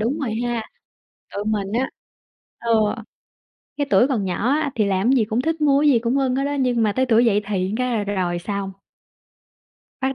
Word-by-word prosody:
đúng 245 Hz, +8 st, -1 dB
rồi 240 Hz, -7 st, -2 dB
ha, 240 Hz, -2 st, -1 dB, 0.7 s
tụi 205 Hz, -, -3 dB
mình 205 Hz, -2 st, -2 dB
á, 250 Hz, +4 st, 0 dB, 0.7 s
ờ, 235 Hz, -, -4 dB, 1.1 s
cái 285 Hz, -, -1 dB
tuổi 250 Hz, -, +5 dB
còn 230 Hz, -8 st, -1 dB
nhỏ 190 Hz, +6 st, -1 dB
á 290 Hz, 0 st, +1 dB
thì 215 Hz, -, +1 dB
làm 200 Hz, +6 st, +2 dB
gì 240 Hz, -5 st, +3 dB
cũng 220 Hz, +3 st, -1 dB
thích 320 Hz, +1 st, -1 dB
mua 280 Hz, -2 st, +4 dB
cái 295 Hz, -, +4 dB
gì 240 Hz, -, +4 dB
cũng 235 Hz, +4 st, 0 dB
ưng 260 Hz, -2 st, +1 dB
hết 275 Hz, -, 0 dB
á, 285 Hz, 0 st, -2 dB
nhưng 250 Hz, -3 st, +1 dB
mà 210 Hz, -2 st, +2 dB
tới 260 Hz, +3 st, 0 dB
tuổi 235 Hz, 0 st, +4 dB
dậy 210 Hz, -2 st, +3 dB
thì 190 Hz, -2 st, -1 dB
cái 250 Hz, 0 st, -1 dB
là 205 Hz, -, -1 dB
rồi 185 Hz, -4 st, -1 dB
xong. 200 Hz, +1 st, -4 dB, 1.3 s
Bắt 265 Hz, 0 st, -1 dB
235 Hz, 205 wpm, -22 LUFS, 205-265 Hz, 1.3 s, tuổi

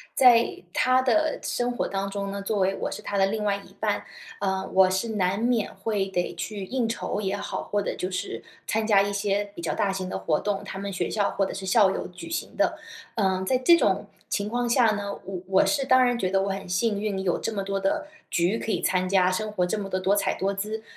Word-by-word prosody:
在 240 Hz, -7 st, +5 dB
他 255 Hz, +5 st, +3 dB
的 310 Hz, +5 st, +2 dB
生 245 Hz, 0 st, -1 dB
活 245 Hz, -, -1 dB
当 195 Hz, 0 st, -2 dB
中 200 Hz, 0 st, -3 dB
呢， 200 Hz, -, -4 dB
作 205 Hz, +1 st, -1 dB
为 190 Hz, 0 st, +2 dB
我 -, -, -3 dB
是 -, -, -6 dB
他 200 Hz, -, -3 dB
的 195 Hz, -, +5 dB
另 210 Hz, +2 st, -2 dB
外 200 Hz, -1 st, +1 dB
一 195 Hz, -1 st, -14 dB
半， 205 Hz, -1 st, 0 dB, 0.3 s
呃， 190 Hz, -1 st, -1 dB
我 190 Hz, 0 st, +6 dB
是 190 Hz, +5 st, -1 dB
难 195 Hz, -3 st, 0 dB
免 230 Hz, -1 st, 0 dB
会 200 Hz, 0 st, -1 dB
得 180 Hz, -2 st, -2 dB
去 200 Hz, +3 st, -5 dB
应 245 Hz, +3 st, -1 dB
酬 225 Hz, -, -2 dB
也 200 Hz, -1 st, -1 dB
好， 200 Hz, -, -4 dB
或 205 Hz, 0 st, -1 dB
者 -, -, -2 dB
就 185 Hz, -, -2 dB
是 185 Hz, +2 st, -4 dB, 0.3 s
参 220 Hz, 0 st, 0 dB
加 205 Hz, -3 st, +6 dB
一 200 Hz, +1 st, 0 dB
些 200 Hz, 0 st, 0 dB
比 170 Hz, -, -8 dB
较 170 Hz, -, -2 dB
大 205 Hz, -3 st, +1 dB
型 190 Hz, -1 st, -3 dB
的 -, -, -3 dB
活 155 Hz, -2 st, 0 dB
动， 205 Hz, -1 st, -2 dB
他 195 Hz, -1 st, -6 dB
们 200 Hz, 0 st, -4 dB
学 190 Hz, -, -1 dB
校 205 Hz, -2 st, +1 dB
或 195 Hz, -, +1 dB
者 -, -, -5 dB
是 195 Hz, 0 st, -6 dB
校 195 Hz, 0 st, +5 dB
友 -, -, -3 dB
举 180 Hz, -, -10 dB
行 330 Hz, -, -4 dB
的。 -, -, +1 dB, 0.4 s
呃， 190 Hz, -3 st, +1 dB
在 255 Hz, -, +2 dB
这 260 Hz, +7 st, +6 dB
种 -, -, +1 dB, 0.2 s
情 205 Hz, 0 st, -1 dB
况 240 Hz, +1 st, -1 dB
下 240 Hz, -1 st, +5 dB
呢， 200 Hz, -1 st, -3 dB
我 190 Hz, -1 st, -5 dB
我 190 Hz, 0 st, +4 dB
是 280 Hz, -3 st, +1 dB
当 255 Hz, 0 st, +5 dB
然 245 Hz, -1 st, +2 dB
觉 185 Hz, -5 st, 0 dB
得 195 Hz, 0 st, +2 dB
我 195 Hz, -, -1 dB
很 195 Hz, 0 st, -4 dB
幸 200 Hz, +4 st, +1 dB
运， 205 Hz, -3 st, -1 dB
有 180 Hz, -2 st, +1 dB
这 225 Hz, -, -3 dB
么 200 Hz, -2 st, -2 dB
多 195 Hz, 0 st, -2 dB
的 195 Hz, +10 st, 0 dB, 0.2 s
局 175 Hz, +6 st, +1 dB
可 225 Hz, -, -5 dB
以 -, -, 0 dB
参 185 Hz, 0 st, +1 dB
加， 185 Hz, -1 st, +3 dB
生 215 Hz, +3 st, -2 dB
活 185 Hz, -4 st, 0 dB
这 195 Hz, +5 st, -1 dB
么 195 Hz, -1 st, -5 dB
的 185 Hz, -, -1 dB
多 190 Hz, +2 st, +2 dB
彩 205 Hz, -, +1 dB
多 195 Hz, +1 st, 0 dB
姿， 215 Hz, +3 st, -4 dB
200 Hz, 270 characters per minute, -26 LUFS, 190-220 Hz, 0.4 s, 我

